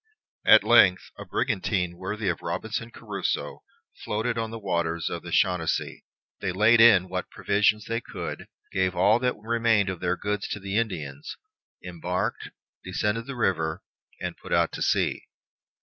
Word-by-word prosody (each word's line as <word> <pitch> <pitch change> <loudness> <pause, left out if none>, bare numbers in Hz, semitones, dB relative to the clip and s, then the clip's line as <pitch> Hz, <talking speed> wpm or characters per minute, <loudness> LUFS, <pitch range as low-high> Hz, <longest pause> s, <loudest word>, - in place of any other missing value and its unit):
At - - +8
length - - +5
a - - -7
brigantine 95 -6 -1
worthy 100 +4 -4
of 85 -3 -1
Robinson 110 +6 -4
Crusoe 100 -5 -4 0.4
floated 110 +3 -1
on 115 -1 -2
the 115 - -6
waters 85 -5 -2
of - - -4
the - - -9
Chenonceau. 90 -3 +1 0.4
They 95 - -2
laid 110 +5 +5
in 100 -6 +7
what 90 0 -4
provision 105 +1 +2
they 115 +1 -2
could, - - -7 0.2
gave 95 -1 0
all 100 +6 +4
that 125 0 0
remained 110 -2 +1
of 95 -3 -4
their 90 0 -1
goods 105 0 -2
to 105 - -4
the 95 0 -5
Indians, 80 -11 -3 0.5
embarked, 90 0 -3 0.3
descended 105 +5 -2
the 140 - -5
river, 80 -6 -1 0.4
and - - -4
put - - 0
to - - -7
sea. - - +1
100 Hz, 150 wpm, -26 LUFS, 90-110 Hz, 0.5 s, At